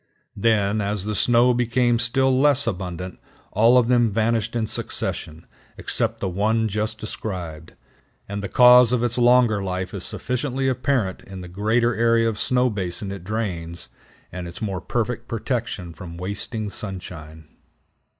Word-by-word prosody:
Then, 105 -1 +1
as 100 -1 -2
the 105 - -2
snow 120 +3 +4
became 120 0 +1
still 130 +3 +2
less 145 -1 +4
abundant, 90 -4 -4 0.3
all 115 +4 +5
of 120 -2 +4
them 120 -2 +3
vanished 115 +1 0
in 115 -2 0
succession, 80 -6 -3 0.3
except - - -1
the - - -1
one 110 +5 +1
just 110 +1 -2
described; 90 -7 -6 0.5
and 100 0 -4
the 100 - -5
cause 125 -1 +7
of 125 -1 +1
its 120 +1 0
longer 120 -4 +4
life 90 -1 -3
is - - -5
sufficiently 130 +1 -1
apparent 125 -6 0
in 95 -1 -9
the 90 - -8
greater 110 +6 +1
area 115 +1 +3
of 110 -2 -2
snow 125 0 +2
basin 95 -2 -4
it 100 -3 -7
drains, 90 -5 -4 0.4
and 90 -1 -6
its 85 - -8
more 95 -4 -3
perfect 120 +3 -2
protection 115 -7 -3
from 85 +1 -9
wasting 100 +3 -4
sunshine. 80 -6 -8
110 Hz, 150 wpm, -23 LUFS, 95-120 Hz, 0.5 s, cause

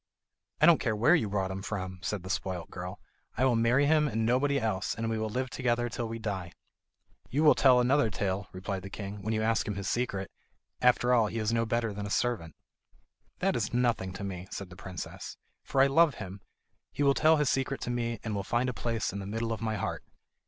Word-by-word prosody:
"I 150 - +6
don't 170 -1 +7
care 110 -2 0
where 120 +10 +4
you 145 - +2
brought 95 -2 -1
him 95 0 -4
from," 95 -2 -4
said 100 -2 -3
the 95 - -8
spoilt 90 -3 -3
girl. 90 +2 -6 0.4
"I 130 - +3
will 125 -2 +3
marry 120 +5 +3
him 150 0 +4
and 110 -4 -1
nobody 140 +4 +2
else, 105 -5 -1
and 115 0 -2
we 110 - -1
will 110 0 -1
live 130 +3 -2
together 120 -2 0
till 120 0 -3
we 115 +1 -5
die." 95 -6 -4 0.8
"You 145 +6 +1
will 150 - +8
tell 130 -2 +5
another 125 0 +3
tale," 100 -1 -2
replied 95 +1 -4
the 100 - -8
king, 100 0 -6
"when 110 +3 -2
you 110 - 0
ask 110 -1 +1
him 105 - -2
his 100 -1 -4
secret. 100 -6 -2 0.5
After 125 0 +4
all 115 -3 +4
he 115 - -5
is 110 0 0
no 115 0 +1
better 115 -1 0
than 100 0 -5
a - - -6
servant." 100 -8 -1 0.9
"That - - +2
is - - -1
nothing 120 -6 +1
to 100 - -7
me," 95 -2 -5
said 95 -2 -7
the - - -10
princess, 90 -2 -7 0.3
"for 135 - +1
I - - +7
love 145 +1 +4
him. 95 0 -8 0.5
He 145 - -1
will 140 -1 +5
tell 155 +2 +4
his 150 -3 +2
secret 135 +1 -1
to 120 - -2
me, 120 -2 -2
and 110 - -3
will 100 - -1
find 120 +6 0
a - - -3
place 115 -5 -2
in 100 - -4
the 95 - -6
middle 115 +2 -2
of 110 - -6
my 110 -1 -1
heart." 100 - -3
115 Hz, 235 wpm, -30 LUFS, 100-125 Hz, 0.9 s, will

